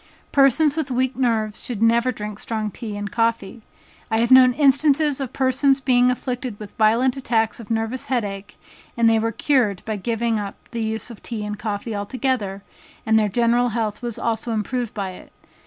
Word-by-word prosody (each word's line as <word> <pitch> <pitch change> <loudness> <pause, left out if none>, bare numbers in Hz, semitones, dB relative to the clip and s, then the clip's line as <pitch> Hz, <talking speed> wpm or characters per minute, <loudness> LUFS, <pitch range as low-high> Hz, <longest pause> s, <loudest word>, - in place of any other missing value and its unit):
Persons 280 +2 +4
with 315 -4 -2
weak 255 +1 0
nerves 225 -4 0
should 240 -5 -4
never 235 +3 +3
drink 210 -3 -6
strong 215 -2 -3
tea 215 -1 -6
and 205 -1 -5
coffee. 230 -2 -1 0.5
I 220 - +1
have 235 +2 +1
known 255 -1 +8
instances 285 +1 +3
of 265 - -4
persons 270 +1 +2
being 250 -2 +3
afflicted 250 -3 -3
with 210 -2 -10
violent 235 +4 +3
attacks 225 -4 0
of 225 - -11
nervous 225 +3 -2
head 250 -3 0
ache, 195 +1 -8 0.4
that 225 -1 +3
were 225 +1 0
cured 230 -5 +1
by 220 -1 -3
giving 230 +2 -1
up 200 -1 -5 0.2
the 235 -2 -3
use 220 +1 -3
of 230 - -12
tea 220 -3 -5
and 210 0 -4
coffee 210 +1 -4
altogether, 205 -2 -2 0.4
and 220 0 +4
their 210 -1 +1
general 240 +3 +2
health 215 -2 -2
was 240 -2 -5
also 230 0 -2
improved 235 +2 -3
by 195 -3 -3
it. 185 - -13
230 Hz, 185 wpm, -22 LUFS, 215-255 Hz, 0.5 s, known